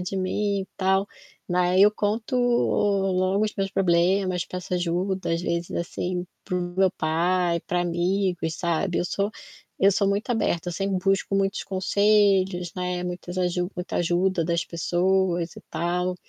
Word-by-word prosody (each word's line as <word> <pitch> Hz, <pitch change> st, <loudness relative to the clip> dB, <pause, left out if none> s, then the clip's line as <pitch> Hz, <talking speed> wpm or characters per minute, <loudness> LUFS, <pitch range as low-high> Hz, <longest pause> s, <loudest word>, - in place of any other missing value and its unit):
de 185 Hz, +2 st, -4 dB
mim 200 Hz, +1 st, 0 dB
e 190 Hz, -, -10 dB
tal", 190 Hz, +1 st, +2 dB, 0.4 s
na 180 Hz, 0 st, +1 dB
ai 185 Hz, +1 st, +3 dB
eu 210 Hz, -, +7 dB
conto 220 Hz, +5 st, -1 dB
logo 200 Hz, -5 st, +2 dB
os 215 Hz, -, -3 dB
meus 195 Hz, -1 st, -2 dB
problemas, 185 Hz, 0 st, +2 dB
peço 180 Hz, 0 st, -7 dB
ajuda 180 Hz, +2 st, -1 dB
às 170 Hz, -, -3 dB
vezes, 170 Hz, -1 st, -2 dB
assim, 180 Hz, +1 st, -3 dB, 0.2 s
para 185 Hz, -, -3 dB
o 175 Hz, 0 st, -3 dB
meu 190 Hz, -1 st, +4 dB
pai, 170 Hz, +2 st, 0 dB
para 180 Hz, +2 st, -1 dB
amigos 175 Hz, -1 st, 0 dB
sabe. 175 Hz, +1 st, -1 dB
Eu -, -, 0 dB
sou 200 Hz, +3 st, -1 dB, 0.5 s
eu 195 Hz, -, +5 dB
sou 200 Hz, 0 st, +1 dB
muito 200 Hz, +5 st, -1 dB
aberta, 180 Hz, -7 st, 0 dB
sempre 195 Hz, +2 st, -1 dB
busco 195 Hz, 0 st, +1 dB
muitos 195 Hz, +1 st, 0 dB
conselhos, 195 Hz, -2 st, +2 dB
né, 180 Hz, 0 st, -2 dB
muitas 180 Hz, 0 st, -5 dB
aju 180 Hz, 0 st, 0 dB
muita 180 Hz, 0 st, -4 dB
ajuda 175 Hz, 0 st, +1 dB
das 170 Hz, 0 st, 0 dB
pessoas 175 Hz, 0 st, 0 dB
e -, -, -9 dB
tal, 180 Hz, +1 st, -1 dB
185 Hz, 160 wpm, -25 LUFS, 175-195 Hz, 0.5 s, eu